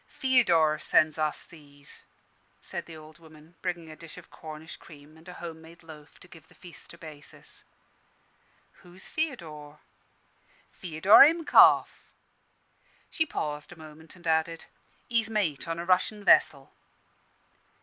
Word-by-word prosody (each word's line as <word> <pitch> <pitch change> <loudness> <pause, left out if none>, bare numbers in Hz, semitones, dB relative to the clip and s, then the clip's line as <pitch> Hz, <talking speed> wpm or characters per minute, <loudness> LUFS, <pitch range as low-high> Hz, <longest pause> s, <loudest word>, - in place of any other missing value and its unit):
"Feodor 170 - +2
sends 155 +1 +2
us 155 -1 -2
these," 145 -3 -14 0.5
said - - -7
the 165 -1 -11
old 155 +1 -15
woman, 160 0 -18
bringing 170 -2 -5
a - - -11
dish 165 +1 -13
of 180 - -14
Cornish 155 +1 -10
cream 150 0 -16
and 160 +2 -16
a - - -9
home 165 -2 -9
made 165 +2 -16
loaf 155 -2 -15
to - - -15
give 165 -2 -17
the - - -23
feast 175 -2 -14
a - - -20
basis. 155 -3 -8 1.2
"Who's 180 +1 -15
Feodor?" 160 - -5 0.9
"Feodor 180 +4 +4
Himkoff." 325 +2 +4 1.0
She 315 -2 -1
paused 150 - -5
a - - -11
moment, 155 0 -15
and 175 -1 -18
added, 160 0 -1 0.4
"He's 230 -2 0
mate 180 -12 -2
on 165 0 -3
a 170 - -5
Russian 185 +3 0
vessel." 140 -7 +3
160 Hz, 140 wpm, -27 LUFS, 155-180 Hz, 1.2 s, Feodor